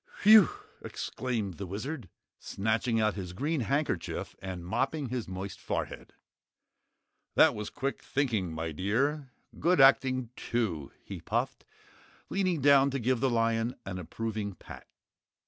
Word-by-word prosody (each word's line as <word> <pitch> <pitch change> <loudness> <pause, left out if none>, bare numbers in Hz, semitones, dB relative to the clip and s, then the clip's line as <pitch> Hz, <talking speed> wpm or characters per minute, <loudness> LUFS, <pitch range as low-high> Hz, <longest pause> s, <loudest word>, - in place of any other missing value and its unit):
"Whew!" 215 -3 +9 0.3
exclaimed 110 -8 -3
the 100 - -4
Wizard, 110 - -5 0.3
snatching 115 +3 0
out 110 -1 +2
his 90 -3 -6
green 150 - -1
handkerchief 130 - -2
and 90 -2 -6
mopping 135 - -1
his 125 -2 -3
moist 95 +1 -6
forehead. - - -4 1.2
"That - - +6
was 105 0 -5
quick 135 +1 -3
thinking, 115 - -1
my 80 0 -3
dear. 130 - 0 0.3
Good 175 +1 +3
acting, 130 -2 +5
too," 95 - -2
he - - -8
puffed, - - -2 0.7
leaning 185 -5 +1
down 140 0 +6
to 135 0 -2
give 125 +1 +1
the 135 - +2
lion 115 +1 +1
an 90 -1 -5
approving 105 +2 -4
pat. - - -12
115 Hz, 130 wpm, -30 LUFS, 95-135 Hz, 1.2 s, Whew